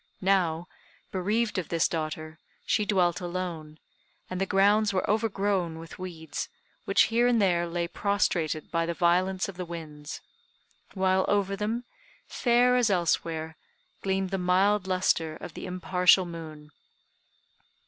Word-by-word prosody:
Now, 175 -3 +2 0.4
bereaved 210 +3 0
of 175 - -5
this 165 -1 +2
daughter, 155 -1 -4 0.3
she 210 - +1
dwelt 180 -4 +2
alone; 170 -4 -5 0.5
and 185 +1 -3
the 195 - +1
grounds 205 +2 +4
were 185 -2 -1
overgrown 200 -5 0
with 165 +2 -10
weeds, 165 -4 -5 0.4
which 195 - +4
here 240 +1 +4
and 240 -2 +3
there 175 -4 +2
lay 170 0 -2
prostrated 170 -6 -1
by 165 -1 0
the 170 - -2
violence 185 +2 +2
of 195 -2 -8
the 180 - -3
winds; 155 -4 -7 0.8
while 190 0 +2
over 200 -1 +1
them, 215 +4 -2 0.4
fair 245 0 +3
as 245 -3 +3
elsewhere, 165 -3 0 0.4
gleamed 190 -1 -1
the 195 - -1
mild 190 +2 +2
lustre 185 -4 +1
of 165 - -9
the - - -7
impartial 180 0 +3
moon. 155 -3 -9
185 Hz, 140 wpm, -28 LUFS, 165-195 Hz, 0.8 s, grounds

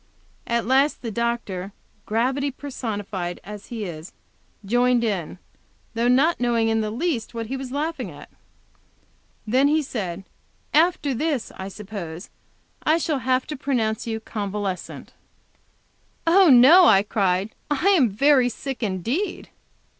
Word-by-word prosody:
At 235 0 0
last 270 +4 +2
the 230 - -3
doctor, 210 -5 -3 0.3
gravity 260 +6 0
personified 205 -10 -5
as 205 +1 -9
he 225 -3 -5
is, 165 -1 -8 0.5
joined 245 +3 +2
in, 190 -7 -2 0.6
though 230 +1 0
not 275 +7 +3
knowing 235 -2 +1
in 225 0 +1
the 215 - -2
least 245 -1 -2
what 230 0 -3
he 255 +5 -4
was 265 -1 -6
laughing 310 +4 -3
at. - - -12 1.2
Then 255 +6 +3
he 305 +1 +2
said, 195 -8 -5 0.5
"After 315 -3 +3
this, 280 -1 -2
I 190 - -6
suppose, 195 -4 -8 0.5
I 310 +2 +3
shall 310 -4 -1
have 255 +1 +1
to 300 - -5
pronounce 235 -5 -1
you 225 -1 -2
convalescent." 205 -3 -5 1.1
"Oh, 355 +2 +6
no!" 280 +8 +8
I 195 - +6
cried. 195 -1 0 0.2
"I 295 +7 +2
am 315 - +4
very 255 +4 +3
sick 265 +2 -6
indeed." 235 - -2
235 Hz, 135 wpm, -23 LUFS, 205-275 Hz, 1.2 s, no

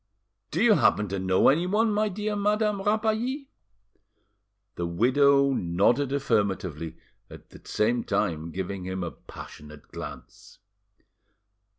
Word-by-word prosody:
"Do - - 0
you - - +6
happen 105 0 +3
to 100 0 -3
know 95 0 +3
anyone, 195 +9 +2
my 210 +1 +1
dear 210 +2 -3
Madame 210 0 0
Rapally?" 220 +7 -1 1.2
The 85 - -3
widow 140 +9 +3
nodded 110 +9 +1
affirmatively, 95 - -1 0.3
at - - -14
the - - -14
same 115 +3 0
time 85 -5 -1
giving 95 +2 -5
him 95 0 -3
a 85 - -4
passionate 75 0 -12
glance. - - -10
120 Hz, 115 wpm, -26 LUFS, -, 1.2 s, you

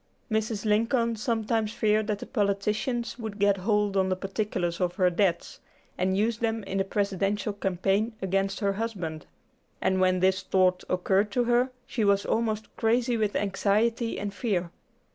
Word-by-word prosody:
Mrs. 220 0 -1
Lincoln 230 +2 +2
sometimes 225 -1 -1
feared 215 -2 +1
that 210 -2 0
the - - -8
politicians 215 +3 -1
would 220 -3 -5
get 200 -1 +3
hold 205 +1 +1
of 190 -1 +2
the 185 - +1
particulars 190 -3 -2
of 175 -1 0
her 185 -3 +3
debts, 175 -1 0 0.4
and 190 +1 0
use 220 +2 +1
them 225 -1 -1
in 195 0 -3
the - - +3
Presidential 200 +1 -1
campaign 195 +3 0
against 195 +1 -1
her 200 -1 +1
husband; 190 -8 -4 0.5
and 190 0 +1
when 185 0 +3
this 190 +1 +2
thought 185 -1 +2
occurred 190 +3 +2
to 245 - +2
her, 240 +2 +2 0.2
she 230 - -2
was 200 -1 +3
almost 220 -1 -1
crazy 235 +2 +2
with 215 -2 0
anxiety 215 +4 +1
and 205 -1 -4
fear. 190 -7 -1
205 Hz, 160 wpm, -27 LUFS, 190-225 Hz, 0.5 s, get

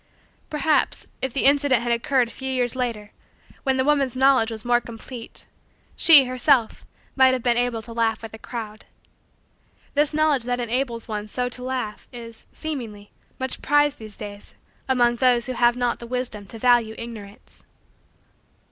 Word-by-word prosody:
Perhaps, 300 0 0 0.2
if 265 - -1
the 270 - 0
incident 275 -4 +4
had 240 - -1
occurred 250 +1 +1
a - - -12
few 265 0 -5
years 250 -1 0
later, 230 -5 -4 0.5
when 265 -1 0
the 260 - +2
woman's 280 -4 +1
knowledge 260 -3 +3
was 225 -1 -6
more 240 0 +2
complete, 230 +1 -9 0.5
she, 295 -5 +9
herself, 255 -1 +1 0.3
might 260 -1 +5
have 255 -2 -3
been 240 -1 +2
able 240 -2 -1
to 230 - -10
laugh 230 -1 -1
with 225 - -8
the 220 - -11
crowd. 220 -3 -8 1.1
This 295 +1 +2
knowledge 300 -5 +1
that 245 0 -2
enables 240 0 -2
one 210 -1 -5
so 245 +3 -3
to 250 0 -7
laugh 250 -5 -5
is, 230 -2 -11
seemingly, 230 -10 -7 0.3
much 260 0 -4
prized 290 0 +2
these 215 -2 -10
days 205 -1 -9 0.3
among 240 -2 +2
those 245 -1 +2
who 255 - -4
have 240 0 +3
not 245 -1 -1
the 235 - -9
wisdom 240 -5 -4
to 225 - -8
value 235 -2 +2
Ignorance. 225 -2 -10
245 Hz, 165 wpm, -23 LUFS, 230-265 Hz, 1.1 s, she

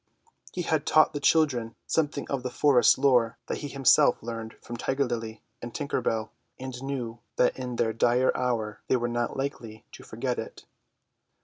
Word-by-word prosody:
He 180 - -3
had 160 -3 0
taught 155 0 +5
the 145 - -3
children 140 -7 +2
something 150 -3 -1
of 135 -2 -2
the 125 - -3
forest 130 0 +4
lore 125 -4 +3
that - - -4
he 145 - -5
had - - -10
himself 135 -2 +5
learned 115 -1 -6
from 120 - -8
Tiger 135 +3 0
Lily 115 -3 -5 0.2
and 120 0 -8
Tinker 140 -2 -2
Bell, 110 -2 -1 0.3
and 130 -1 -6
knew 125 -4 -4 0.2
that 125 - +2
in 125 -2 -5
their 115 -1 0
dire 120 +3 +2
hour 115 -4 -2
they - - +3
were 120 -1 0
not 120 0 -2
likely 115 -5 -5
to - - -12
forget - - -3
it. - - -8
125 Hz, 185 wpm, -27 LUFS, 115-140 Hz, 0.3 s, taught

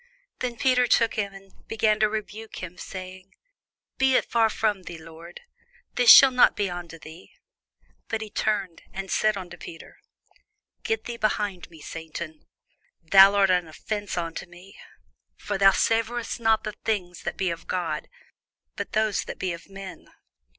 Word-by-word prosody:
Then 245 -2 -3
Peter 250 0 +3
took 230 -1 +3
him, 200 -2 -2
and 195 0 -17
began 215 -1 +1
to 215 0 +3
rebuke 215 -1 -6
him, 180 -1 -7
saying, 185 +1 -9 0.6
Be 265 -1 +4
it - - +3
far 225 -2 +2
from 210 -3 -1
thee, 175 -2 -9
Lord: 165 - -12 0.5
this 245 -2 +3
shall 265 +4 +11
not 250 -1 +5
be 200 -3 -1
unto 170 -2 -7
thee. 155 -11 -14 0.7
But 220 - -3
he 215 -1 -7
turned, 200 -5 -1
and 195 0 -6
said 215 -1 +2
unto 175 -2 -8
Peter, 165 -2 -11 0.8
Get 225 0 -2
thee 235 0 -6
behind 210 -4 -2
me, 160 -2 -15
Satan: 160 0 -8 0.6
thou 195 +1 +8
art 195 -2 +4
an 180 -2 +1
offence 205 +5 -5
unto 165 -1 -4
me: 180 +3 -16 0.6
for - - -4
thou 195 0 +8
savourest 230 +4 0
not 225 -1 +2
the 215 - -4
things 185 -5 -2
that - - -5
be 185 -2 0
of 165 0 -8
God, 180 -3 -3 0.7
but - - -6
those 215 -1 +1
that - - -7
be 185 -2 -2
of 170 +3 -11
men. 195 -1 -10
195 Hz, 165 wpm, -25 LUFS, 175-220 Hz, 0.8 s, shall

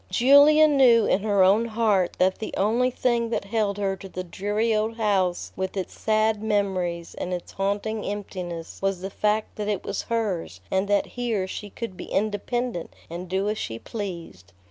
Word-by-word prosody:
Julia 285 +5 +7
knew 255 -6 +5
in 195 - +2
her 205 -2 +3
own 200 +5 +4
heart 215 -5 +1
that 185 +1 +2
the 220 - -5
only 230 +6 +2
thing 240 -2 0
that 225 - -2
held 205 -1 0
her 195 -1 0
to 195 - -10
the 185 0 -5
dreary 205 +5 -1
old 220 +1 -1
house 195 -5 0
with 190 +1 -3
its 190 - -3
sad 215 -1 +1
memories 190 -5 -1
and 180 - -5
its 180 -1 -4
haunting 205 +2 -2
emptiness 180 -5 -6
was 195 -2 -1
the 195 +1 -5
fact 215 +2 -1
that 210 -1 -3
it 205 -3 -1
was - - -3
hers 195 - -2
and 190 +1 +1
that 205 0 +2
here 235 -6 -2
she 205 +2 -6
could 225 -1 -6
be - - -8
independent 215 0 -2 0.2
and 175 +1 -6
do 190 +2 0
as 215 +1 -1
she 115 - -4
pleased. 170 - -7
205 Hz, 185 wpm, -25 LUFS, 185-220 Hz, 0.2 s, Julia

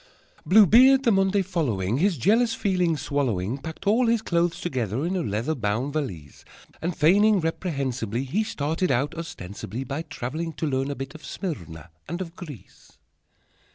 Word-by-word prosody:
Blue 210 +3 +8
Beard, 260 +7 +6
the 235 - +4
Monday 195 0 +2
following, 125 - -1
His 190 -1 +2
jealous 225 - +3
feeling 180 -6 +1
swallowing, 130 -6 -1
Packed 160 +2 -8
all 230 +4 +3
his 230 -1 +2
clothes 175 -2 0
together 130 - -2
In 180 +2 -1
a 185 - 0
leather 115 +3 -1
Bound 120 +3 -2
valise, 95 - -5 0.4
And, 175 +1 -3
feigning 200 +7 +5
reprehensibly, 135 - -2
He 180 +12 0
started 160 -2 -1
out, 135 +5 +1
ostensibly 110 - -6
By 140 +3 -4
traveling 160 +3 -5
to 160 - -3
learn 135 -1 -1
a 140 - -3
Bit 135 +1 -6
of 155 -1 -12
Smyrna 90 - -6 0.2
And 170 +2 -3
of 175 -2 -6
Greece. 145 - -12
155 Hz, 160 wpm, -25 LUFS, 130-185 Hz, 0.4 s, Blue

